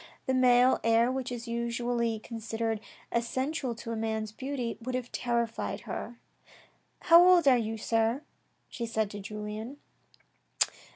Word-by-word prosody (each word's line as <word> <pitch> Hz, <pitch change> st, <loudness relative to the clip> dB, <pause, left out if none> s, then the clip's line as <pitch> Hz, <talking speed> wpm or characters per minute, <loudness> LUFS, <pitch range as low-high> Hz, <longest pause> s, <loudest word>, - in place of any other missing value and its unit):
The 260 Hz, -, 0 dB
male 250 Hz, 0 st, +5 dB
air, 230 Hz, +2 st, +4 dB
which 260 Hz, -1 st, -3 dB
is 240 Hz, -1 st, -5 dB
usually 235 Hz, 0 st, -1 dB
considered 225 Hz, 0 st, -3 dB, 0.3 s
essential 260 Hz, +2 st, -1 dB
to 230 Hz, 0 st, -7 dB
a -, -, -2 dB
man's 220 Hz, -1 st, -2 dB
beauty, 255 Hz, -1 st, -4 dB
would 255 Hz, +2 st, -3 dB
have 255 Hz, -1 st, -4 dB
terrified 235 Hz, -2 st, -2 dB
her. 240 Hz, -, -6 dB, 0.4 s
" -, -, -31 dB
How 340 Hz, -1 st, +8 dB
old 355 Hz, -4 st, +6 dB
are 265 Hz, -, +8 dB
you, 225 Hz, -2 st, -1 dB
sir, 225 Hz, +5 st, 0 dB, 0.4 s
she 235 Hz, -2 st, -5 dB
said 220 Hz, -2 st, -1 dB
to 205 Hz, -, -6 dB
Julien 210 Hz, +5 st, -6 dB
235 Hz, 140 wpm, -29 LUFS, 225-255 Hz, 0.4 s, How